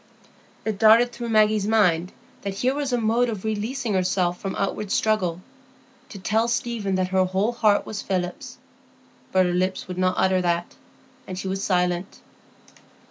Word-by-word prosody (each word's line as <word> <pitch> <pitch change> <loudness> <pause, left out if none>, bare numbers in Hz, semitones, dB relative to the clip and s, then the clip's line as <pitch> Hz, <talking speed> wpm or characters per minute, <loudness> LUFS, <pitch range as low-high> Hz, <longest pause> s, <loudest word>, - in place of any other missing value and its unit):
It 215 -3 -2
darted 230 +3 +6
through 240 -1 -6
Maggie's 215 -2 +3
mind 180 -6 +2 0.3
that 200 -1 -4
here 255 +6 +1
was 285 -2 -2
a 245 - +2
mode 235 +2 +1
of 215 -4 -5
releasing 220 +3 -2
herself 180 -1 0
from 195 - -4
outward 200 +1 -2
struggle,—to 220 +5 -3
tell 220 +4 +1
Stephen 230 -5 -1
that 185 0 0
her 190 0 +3
whole 190 +5 0
heart 215 -4 +2
was 210 - -5
Philip's. 180 -2 -4 0.7
But 185 -1 +4
her 175 - 0
lips 185 +1 -1
would 180 0 -5
not 185 0 +2
utter 190 -1 +2
that, 175 -1 -1 0.5
and 185 - -6
she 190 - -4
was 195 +1 -3
silent. 180 0 0
200 Hz, 160 wpm, -24 LUFS, 185-225 Hz, 0.7 s, darted